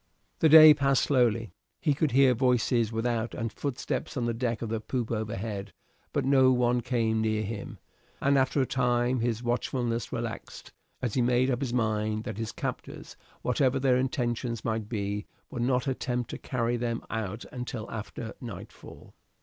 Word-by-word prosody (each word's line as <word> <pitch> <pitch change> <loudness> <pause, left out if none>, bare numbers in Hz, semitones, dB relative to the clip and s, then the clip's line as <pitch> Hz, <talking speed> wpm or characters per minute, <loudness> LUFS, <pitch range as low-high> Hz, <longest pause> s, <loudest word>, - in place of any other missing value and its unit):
The 160 - +5
day 155 0 +11
passed 135 -2 +2
slowly. 115 -5 +2 0.3
He 150 -4 +2
could 150 +2 +1
hear 130 0 +5
voices 120 -2 +2
without 115 0 -1
and 115 -2 -3
footsteps 140 0 -3
on 120 - 0
the 120 - 0
deck 115 0 -2
of 115 - -4
the 115 0 -1
poop 120 0 -3
overhead, 105 -2 -4 0.4
but - - -1
no 130 -1 +5
one 125 -1 +2
came 115 -2 0
near 110 -1 0
him; 105 -1 -6 0.4
and 140 +1 +2
after 135 +1 +2
a - - -1
time 125 0 +1
his 115 0 -1
watchfulness 120 -1 -1
relaxed, - - -6 0.3
as 120 -4 -1
he 130 - +2
made 125 +2 +2
up 125 +1 -1
his 130 -3 -2
mind 110 -2 0
that 110 -3 -6
his 115 -2 -3
captors, - - -6 0.3
whatever 130 +1 +2
their 130 -1 +3
intentions 120 -3 -2
might 110 -2 -2
be, 100 -2 -3 0.2
would 125 - -4
not 125 +1 +1
attempt 125 -2 -2
to - - -6
carry 120 -1 -1
them 115 -1 -2
out 110 0 -4
until 125 -3 -5
after 110 +1 -6
nightfall. 120 -2 -10
120 Hz, 170 wpm, -28 LUFS, 110-130 Hz, 0.4 s, day